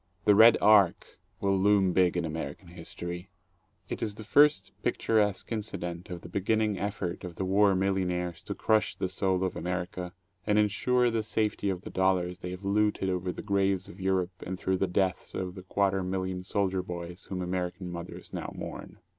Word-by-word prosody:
The 105 - +7
"Red 110 +3 +8
Ark" 100 -4 +4 0.2
will 100 -1 +2
loom 100 -2 +4
big 90 0 +3
in 85 - 0
American 80 +2 -5
history. 85 +1 -7 0.6
It - - -5
is 105 -2 -2
the 110 - -8
first 130 -1 +4
picturesque 105 -2 +1
incident 90 -6 -4
of 90 -2 -6
the - - -9
beginning 105 +2 0
effort 100 -3 -3
of 90 -2 -7
the 95 - -2
War 100 +1 +4
Mil 95 +1 +2
lionaires 90 -2 -2
to - - -4
crush 110 -1 +2
the - - -2
soul 95 0 0
of 95 - -1
America 90 +1 -3 0.4
and 105 -1 +3
insure 120 +4 +2
the 115 -1 0
safety 105 -1 -1
of 90 -2 -2
the - - -8
dollars 90 -1 +1
they 90 - -5
have 90 +2 -7
looted 100 -1 +1
over 90 0 -1
the - - -8
graves 100 -2 +1
of 95 - -12
Europe 95 -1 0
and 95 0 -4
through 95 0 0
the 95 - +1
deaths 95 0 -1
of 90 -1 -3
the 95 - -9
quarter 95 +1 +1
million 95 0 -3
soldier 95 -1 0
boys 90 0 -7
whom 90 -1 -4
American 90 0 -3
mothers 85 0 -8
now - - -4
mourn. - - -7
95 Hz, 190 wpm, -29 LUFS, 90-100 Hz, 0.6 s, Red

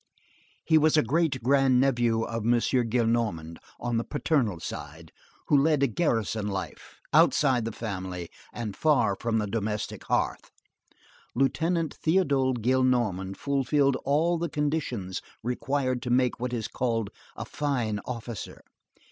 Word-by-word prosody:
He 160 -1 +5
was 155 +1 +3
a 150 - +5
great 135 0 0
grand 135 -1 +4
nephew 120 -4 +2
of 115 -1 -4
M. 120 +2 +3
Gillenormand, 115 -9 0 0.2
on 120 -1 -1
the 115 - 0
paternal 130 - 0
side, 80 +1 -8 0.4
who - - +4
led 145 0 +3
a - - +5
garrison 115 - -1
life, 95 -2 -6
outside 130 -5 +4
the 115 - -2
family 95 -6 -5 0.2
and 110 -5 -5
far 145 -10 +2
from 115 +3 -1
the 105 - 0
domestic 105 0 -3
hearth. - - -1 0.9
Lieutenant 160 +5 0
Théodule 140 -7 +2
Gillenormand 120 -7 +1
fulfilled 140 0 +1
all 160 +5 +2
the 170 0 -2
conditions 145 -11 -2 0.2
required 130 +1 -1
to 125 - -4
make 125 0 +2
what 125 0 -3
is 115 -3 -2
called 115 -4 -2 0.2
a - - -6
fine 120 -8 -2
officer. 115 -4 -7
125 Hz, 135 wpm, -27 LUFS, 110-140 Hz, 0.9 s, He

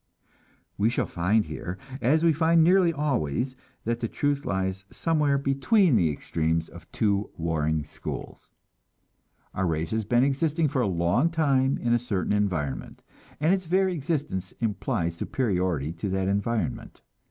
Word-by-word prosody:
We 105 +3 +3
shall 120 - 0
find 100 +5 +1
here, 90 +2 -6 0.2
as 155 +6 +3
we 165 -1 +5
find 165 +2 +4
nearly 180 0 +5
always, 130 - -1 0.3
that 115 +1 -1
the 115 - -1
truth 145 +3 -1
lies 95 0 -2
somewhere 150 -4 +1
between 140 - +3
the 85 -7 +3
extremes 80 +2 -1
of - - -14
two 100 -1 0
warring 80 -2 0
schools. - - -8 1.0
Our 95 -1 0
race 80 0 -1
has 110 0 0
been 120 +3 +3
existing 150 +3 +1
for 135 -2 0
a 115 - +1
long 90 - +2
time 140 -5 +2
in 120 0 0
a 120 - +3
certain 105 -6 -1
environment, 90 -10 -2 0.4
and 155 +5 +3
its 185 -3 -2
very 190 +2 +2
existence 140 - -3
implies 105 -5 -2
superiority 90 - -1
to 90 +4 -4
that 95 0 0
environment. 115 +3 -2
115 Hz, 150 wpm, -26 LUFS, 95-145 Hz, 1.0 s, we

